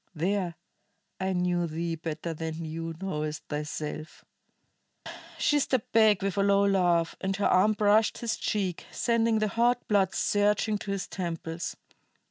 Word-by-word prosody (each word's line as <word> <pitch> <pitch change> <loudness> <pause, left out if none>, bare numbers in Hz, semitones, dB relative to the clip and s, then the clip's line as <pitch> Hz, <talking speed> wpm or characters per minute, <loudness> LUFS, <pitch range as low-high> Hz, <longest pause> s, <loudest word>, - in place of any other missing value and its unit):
There, 180 +1 -1 0.6
I 190 0 0
knew 180 -1 +1
thee 165 +1 -3
better 165 0 -4
than 160 +1 -5
thou 165 +1 -4
knowest 155 -5 -3
thyself." 150 +1 -5 1.1
She 295 -2 +3
stepped 260 -4 -1
back 215 -4 +4
with 195 0 -1
a - - +3
low 200 0 +4
laugh, 175 -4 +2
and 195 0 -1
her 200 - -1
arm 200 +4 +4
brushed 210 +1 +3
his 235 -1 -2
cheek, 190 -5 -2
sending 230 -1 +1
the 215 -1 +1
hot 240 +3 +1
blood 195 -3 +2
surging 210 +1 +1
to 200 - -5
his 195 -1 -3
temples. 165 -2 -4
190 Hz, 145 wpm, -28 LUFS, 165-210 Hz, 1.1 s, back